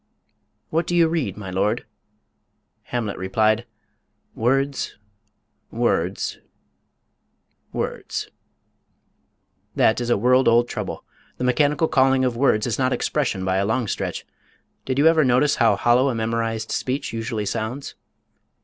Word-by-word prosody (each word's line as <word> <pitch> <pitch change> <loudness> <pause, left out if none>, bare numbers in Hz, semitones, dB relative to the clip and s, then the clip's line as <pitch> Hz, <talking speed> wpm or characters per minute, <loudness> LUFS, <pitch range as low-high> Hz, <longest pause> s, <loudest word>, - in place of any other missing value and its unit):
"What 165 +2 0
do 175 - 0
you 170 -1 +5
read, 155 - -2
my 95 -3 -7
lord?" 105 +6 0 1.0
Hamlet 115 -5 -3
replied, 110 +5 +1 0.7
"Words. 135 +4 0 0.7
Words. 100 -6 -1 1.3
Words." - - -4 1.4
That 110 +2 +3
is 120 - -3
a 120 - +3
world 125 +5 +3
old 120 +1 +4
trouble. - - -5 0.3
The - - -4
mechanical 145 +5 +2
calling 135 -3 +3
of 125 -2 0
words 115 -4 +2
is 120 0 -2
not 130 0 +2
expression, 125 -10 -1
by 95 0 +1
a 100 - +1
long 110 +1 0
stretch. - - -3 0.6
Did 130 0 -2
you 145 - +3
ever 160 -1 +5
notice 130 +3 +3
how 115 -3 +4
hollow 125 +5 +3
a 125 - -2
memorized 115 0 -2
speech 130 0 -2
usually 115 -2 -3
sounds? 115 +7 -4
120 Hz, 130 wpm, -22 LUFS, 110-135 Hz, 1.4 s, you